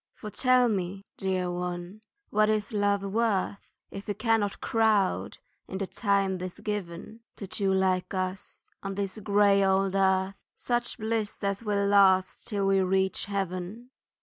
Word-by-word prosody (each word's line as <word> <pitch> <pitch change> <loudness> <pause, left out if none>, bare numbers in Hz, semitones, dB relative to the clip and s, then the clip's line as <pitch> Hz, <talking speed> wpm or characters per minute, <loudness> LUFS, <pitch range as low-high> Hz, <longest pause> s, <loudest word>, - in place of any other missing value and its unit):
For 210 - -8
tell 255 +2 +4
me, 195 -2 -2
dear 185 -2 -1
one, 175 +3 -5 0.3
what 215 0 +3
is 215 0 -1
love 205 -1 +1
worth 200 -1 0 0.3
If 195 +1 -8
it 205 - -2
cannot 220 -3 +1
crowd 220 -4 +1 0.3
in 190 - -5
the 195 - -2
time 195 -2 0
'tis 180 0 -6
given 205 0 -5 0.2
To 200 - -7
two 195 +1 0
like 185 -1 +1
us, 185 +1 -5
on 195 -1 -4
this 200 +1 -3
grey 200 -1 +4
old 190 0 +2
earth, 190 0 +2 0.2
Such 240 -1 -2
bliss 220 -2 -3
as 200 +2 -1
will 205 -2 0
last 190 -1 +4
till 205 -4 -1
we 195 0 +3
reach 190 0 +1
heaven? 195 +4 -4
195 Hz, 150 wpm, -28 LUFS, 190-210 Hz, 0.3 s, tell